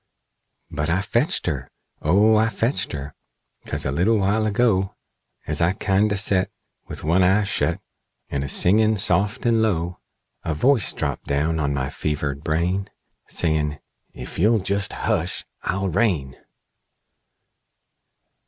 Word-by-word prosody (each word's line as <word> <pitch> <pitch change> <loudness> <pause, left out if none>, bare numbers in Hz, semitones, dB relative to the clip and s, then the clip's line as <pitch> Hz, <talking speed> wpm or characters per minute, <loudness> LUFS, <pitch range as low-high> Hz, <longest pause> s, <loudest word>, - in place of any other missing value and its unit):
"But 75 +2 -2
I 90 +3 +1
fetched 120 +8 0
her! 70 -6 -3 0.3
O 100 +8 +4
I 110 +1 +3
fetched 115 +5 -1
her! 70 -1 -6 0.5
'Cause - - -3
a 65 - 0
little 95 +10 +2
while 105 +2 +1
ago, 100 -3 +1 0.5
As 75 +2 0
I 85 +2 +3
kindo' 100 +1 +1
set, 100 -1 +1 0.4
With - - -7
one 85 +5 +2
eye 95 +3 +4
shet, 100 - -1 0.5
And 70 -1 -3
a - - -4
singin' 110 +8 +4
soft 100 +5 +2
and 115 -1 +3
low, 90 -5 -1 0.4
A 80 - -2
voice 125 - +4
drapped - - -4
down 75 +3 0
on 70 -1 0
my 65 0 -2
fevered 75 -2 -3
brain, 90 +5 -1 0.4
Sayin', 75 -3 0 0.4
'Ef - - -8
you'll 110 +6 +4
jest 100 0 -1
hush 95 -6 -2 0.2
I'll 95 +1 -2
rain!'" 80 - 0
95 Hz, 135 wpm, -22 LUFS, 75-105 Hz, 0.5 s, O